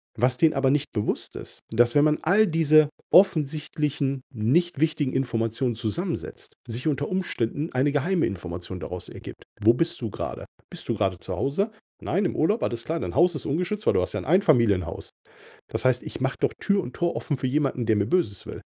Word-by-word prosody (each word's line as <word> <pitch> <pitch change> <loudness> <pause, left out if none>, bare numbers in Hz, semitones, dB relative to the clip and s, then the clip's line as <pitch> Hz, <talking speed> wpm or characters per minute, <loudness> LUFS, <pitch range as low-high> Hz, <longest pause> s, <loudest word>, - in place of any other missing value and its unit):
Was 125 0 +1
denen 160 +1 +4
aber 135 -1 +2
nicht 145 +1 0
bewusst 105 -2 -2
ist, - - -8
dass 120 +1 +3
wenn 145 - +6
man 155 0 +2
all 200 +6 +4
diese 155 -3 +4 0.2
offensichtlichen, 150 -5 +2
nicht 135 +8 +1
wichtigen 155 -3 +1
Informationen 120 -1 -1
zusammensetzt, 145 - -4
sich 120 +5 -4
unter 145 -1 0
Umständen 160 -5 -2
eine 130 +3 +2
geheime 160 +5 +1
Information 90 0 -6
daraus 90 +2 -6
ergibt. - - -10 0.2
Wo 110 +3 +5
bist 165 +7 -1
du 115 -3 -3
grade? - - -5 0.2
Bist - - -7
du - - +1
grade 95 -2 0
zu 95 - -6
Hause? 150 - 0 0.3
Nein, 195 +3 0
im - - -1
Urlaub, 205 +9 +1
alles 120 0 -2
klar. 165 +1 -2
Dein - - -4
Haus 175 +1 +5
ist 150 - -5
ungeschützt, 180 +8 -2
weil - - +5
du - - +4
hast 90 - -3
ja - - -1
'n - - -7
Einfamilienhaus. 125 - +2 0.6
Das - - -3
heißt, 125 -1 +3
ich - - -7
mache 130 +1 -1
doch - - +2
Tür 200 -1 +2
und 125 - -8
Tor 170 0 0
offen 145 - -2
für 130 - -2
jemanden, 135 -3 0
der 110 -1 +3
mir 100 -1 +1
Böses 115 - 0
will. - - -8
140 Hz, 200 wpm, -25 LUFS, 115-165 Hz, 0.6 s, wenn